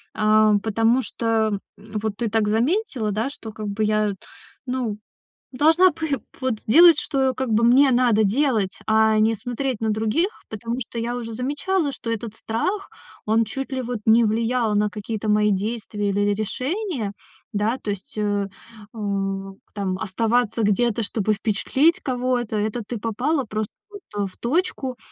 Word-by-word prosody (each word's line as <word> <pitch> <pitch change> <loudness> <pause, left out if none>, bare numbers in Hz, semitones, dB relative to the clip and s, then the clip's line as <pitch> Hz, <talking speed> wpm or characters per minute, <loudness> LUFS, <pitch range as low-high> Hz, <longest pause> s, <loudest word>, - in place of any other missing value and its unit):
Ам, 215 -1 +4
потому 225 +4 +2
что, 220 -4 0 0.2
м, 215 +1 -6
вот 215 -2 -3
ты 235 -1 -1
так 220 0 +1
заметила, 240 - 0
да, 220 +6 -1
что 225 -5 -9
как 215 -1 -6
бы 205 +2 -1
я, 215 -1 +1 0.5
ну, 250 -5 -2 0.5
должна 320 +7 +5
пы 290 -5 -2 0.2
вот 255 -5 -1
сделать, 330 +7 +7
что 265 -2 0
как 260 -3 -2
бы 220 +2 +3
мне 260 +4 +6
надо 240 -3 +4
делать, 215 -3 +1
а 220 0 +4
не 220 +1 +3
смотреть 245 +1 -3
на 220 - 0
других. 220 - +1 0.2
Потому 230 +3 -4
что 235 -1 -6
я 235 +1 -2
уже 230 -2 -5
замечала, 290 - -1
что 235 - -6
этот 225 -1 -4
страх, 370 - -2 0.4
он 220 +2 +3
чуть 270 +5 -5
ли 260 -1 -2
вот 240 -1 -3
не 225 +2 +6
влиял 225 +1 +1
на 210 0 +2
какие-то 215 +1 -4
мои 210 0 +3
действия 205 0 -2
или 200 +1 0
ри 205 0 +2
решения. 255 - -2 0.4
Да, 215 +4 0
то 210 - -4
есть, 205 +6 -8
э, 205 -1 0 0.5
у 195 -2 -3 0.2
там 190 -3 -2
оставаться 225 +3 0
где-то, 225 +2 +2
чтобы 215 0 0
впечатлить 265 - +1
кого-то- 250 -3 -1
это 215 +3 -1
ты 240 - -4
попала 250 +7 -1
просто, 215 -1 -3 0.2
вот, 405 -1 -10 0.2
э, - - -1
в 185 - -15
точку. 265 -2 -1
225 Hz, 165 wpm, -23 LUFS, 210-255 Hz, 0.5 s, сделать